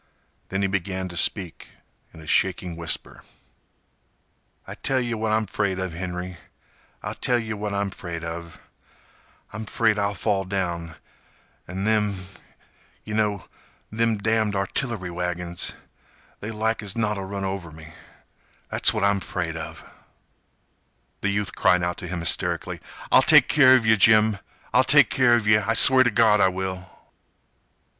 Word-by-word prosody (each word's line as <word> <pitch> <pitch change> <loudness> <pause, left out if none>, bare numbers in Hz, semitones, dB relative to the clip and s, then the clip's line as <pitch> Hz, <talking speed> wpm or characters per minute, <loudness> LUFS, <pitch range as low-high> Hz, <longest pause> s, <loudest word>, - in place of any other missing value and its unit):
Then 95 +1 -2
he - - +2
began 95 -1 -3
to 85 - -9
speak 90 +1 0 0.4
in 80 - -14
a - - -13
shaking 90 +1 0
whisper: 85 0 -1 1.4
"I - - -8
tell 135 -1 0
yeh 120 -1 -2
what 110 -1 -2
I'm 110 0 +1
'fraid 100 -2 -2
of, 95 -3 -4
Henry—I'll 90 -2 -9
tell 125 - 0
yeh 115 -2 -4
what 105 0 -4
I'm 100 0 -2
'fraid 85 -3 -7
of. 85 0 -7 1.0
I'm 110 +1 -6
'fraid 110 -2 +1
I'll 100 0 -1
fall 100 0 -1
down—an' 90 0 -7
them 105 -1 +1 0.9
yeh 105 - -7
know—them 110 +2 -3
damned 110 0 0
artillery 100 -1 -3
wagons—they 90 +4 -5
like 110 +1 -1
as 100 0 -4
not 105 -2 0
'll - - -5
run 100 0 -5
over 95 -4 -5
me. 80 0 -13 0.8
That's - - +3
what 110 -3 -2
I'm 100 0 +2
'fraid 85 -3 -4
of—" 80 - -8 1.3
The 100 - 0
youth 100 0 -2
cried 90 -1 +2
out 85 0 -2
to 90 - -7
him 90 -1 -4
hysterically: 85 - -1 0.3
"I'll - - +7
take - - +6
care 130 -3 +6
of 125 -3 +1
yeh, 110 0 +4
Jim! 110 0 +4 0.3
I'll - - +5
take - - +5
care 120 -1 +4
of 115 -3 -1
yeh! 105 0 +4
I 115 +2 0
swear 130 +3 +8
t' 125 - +2
Gawd 105 -2 +3
I - - +5
will!" 95 0 -4
100 Hz, 150 wpm, -24 LUFS, 90-110 Hz, 1.4 s, swear